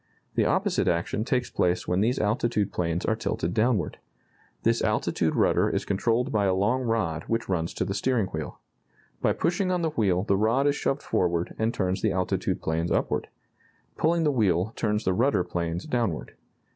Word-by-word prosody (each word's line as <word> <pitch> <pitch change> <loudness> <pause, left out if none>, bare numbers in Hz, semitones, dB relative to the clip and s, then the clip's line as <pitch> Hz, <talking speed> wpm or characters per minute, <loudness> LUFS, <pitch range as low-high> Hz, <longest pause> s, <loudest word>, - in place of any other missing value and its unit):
The - - +2
opposite - - +1
action 85 +5 0
takes 125 +1 -1
place 90 0 0
when 90 +2 +1
these 120 +4 +1
altitude 105 -1 0
planes 85 0 -1
are 110 - +1
tilted 90 -5 -2
downward. 110 -3 +1 0.6
This - - +2
altitude - - 0
rudder - - +3
is - - -1
controlled 115 +5 0
by 105 -2 +2
a 95 -1 +2
long 105 +7 +1
rod 110 -10 -1
which 115 +1 -1
runs 85 -3 -1
to - - -1
the 95 - -2
steering 115 +2 +1
wheel. 80 -3 -5 0.6
By - - +3
pushing 175 +3 0
on 180 -2 0
the 160 - 0
wheel 95 -8 +1
the 100 -1 +1
rod 115 +7 +2
is 145 0 +3
shoved 140 -1 -1
forward 85 -1 0
and 110 +1 +1
turns 95 -4 -1
the 110 - +1
altitude 90 -1 -1
planes 80 +2 -1
upward. - - 0 0.7
Pulling 165 +1 +2
the 150 - +3
wheel 100 -4 +1
turns 105 -1 0
the 95 - +1
rudder 115 -3 +2
planes 85 0 -3
downward. 100 - -2
105 Hz, 185 wpm, -26 LUFS, 90-120 Hz, 0.7 s, rudder